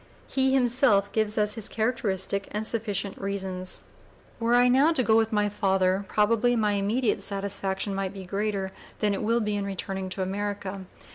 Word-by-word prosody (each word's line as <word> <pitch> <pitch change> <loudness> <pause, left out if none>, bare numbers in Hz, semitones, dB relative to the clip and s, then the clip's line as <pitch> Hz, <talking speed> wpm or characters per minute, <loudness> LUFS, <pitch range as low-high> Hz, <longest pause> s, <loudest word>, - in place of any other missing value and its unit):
He 265 -1 +2
himself 245 -6 +3
gives 215 -1 0
us 210 -1 +2
his 225 -3 -3
characteristic 200 -4 -1
and 210 +1 -3
sufficient 205 -4 -1
reasons: 190 -2 -1 0.6
"Were 230 +1 +2
I 245 0 +5
now 270 +6 +4
to 280 -6 +1
go 220 -1 +3
with 225 0 +3
my 210 -1 +2
father 195 -1 +1
probably 230 +4 +2
my 215 -2 +2
immediate 205 +2 0
satisfaction 195 0 -2
might 195 -1 -2
be 195 -1 -9
greater 195 0 -2 0.3
than 210 -1 +1
it 195 - -3
will 230 +2 +1
be 210 -1 -1
in 205 - -1
returning 195 -1 -4
(p. 185 - -6
016) 190 - -2
to - - -4
America. 200 -1 -4
205 Hz, 185 wpm, -26 LUFS, 195-225 Hz, 0.6 s, I